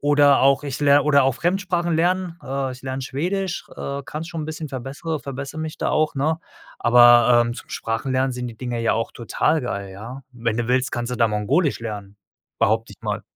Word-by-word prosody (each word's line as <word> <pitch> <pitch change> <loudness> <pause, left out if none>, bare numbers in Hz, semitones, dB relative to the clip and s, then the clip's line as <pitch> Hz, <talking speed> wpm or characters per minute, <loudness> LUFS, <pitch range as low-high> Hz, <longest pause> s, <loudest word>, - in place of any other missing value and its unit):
oder 145 -1 +5
auch 135 +1 +4
ich 140 -3 -4
ler 145 0 +5
oder 140 -3 +5
auch 135 -2 +2
Fremdsprachen 175 -1 0
lernen. 175 +1 0
Äh, 135 -1 -2
ich 125 - -12
lerne 130 0 -4
Schwedisch. 180 +7 -3
Äh, 140 0 -4
kann 150 +3 -5
es 165 - -7
schon 165 -3 -5
'n - - -4
bisschen. 155 0 -5
Verbessere 140 +5 -4
verbessere 140 +2 -6
mich 155 -1 -5
da - - 0
auch, 155 0 +1
ne, 155 +4 +1 0.4
aber, 120 0 +6
ähm, 120 - -2
zum - - -10
Sprachen 115 +4 -3
lernen 130 0 +1
sind 125 0 -4
die 115 - -10
Dinge 120 -1 -4
ja 115 - +2
auch 115 0 -2
total 125 +6 0
geil, 100 -5 -4
ja. 115 +7 -9
Wenn 115 -2 -2
du 120 - -1
willst, 130 +1 +1
kannst 120 0 -3
du - - -2
da 115 - +4
mongolisch 130 - +1
lernen, 105 -3 -7 0.4
behaupte 110 +1 +1
ich - - -18
mal. - - -3
135 Hz, 215 wpm, -22 LUFS, 120-155 Hz, 0.4 s, aber